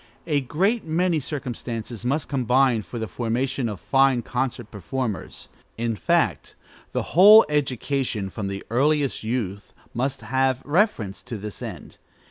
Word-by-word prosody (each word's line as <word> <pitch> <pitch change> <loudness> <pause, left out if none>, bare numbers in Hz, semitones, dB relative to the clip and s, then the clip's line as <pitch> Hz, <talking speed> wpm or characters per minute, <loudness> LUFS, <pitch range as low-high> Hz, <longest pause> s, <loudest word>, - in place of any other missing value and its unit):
A 145 -3 +1
great 190 - 0
many 165 +1 +1
circumstances 120 -5 -5
must 140 +4 -1
combine 130 -3 +2
for 120 - -8
the 110 -1 -3
formation 120 +4 -1
of 105 -4 -6
fine 135 -3 +3
concert 125 -3 -3
performers; 110 +2 -4 0.3
in 115 0 -1
fact, - - 0 0.4
the - - -1
whole 210 +6 +9
education, 135 -7 -1
from 100 0 -4
the 100 0 -5
earliest 140 +2 +1
youth, 110 -4 -3 0.2
must 135 +3 -2
have 130 0 0
reference 145 - +1
to 120 -2 -6
this 105 -1 -7
end. - - -8
130 Hz, 135 wpm, -24 LUFS, 115-140 Hz, 0.4 s, whole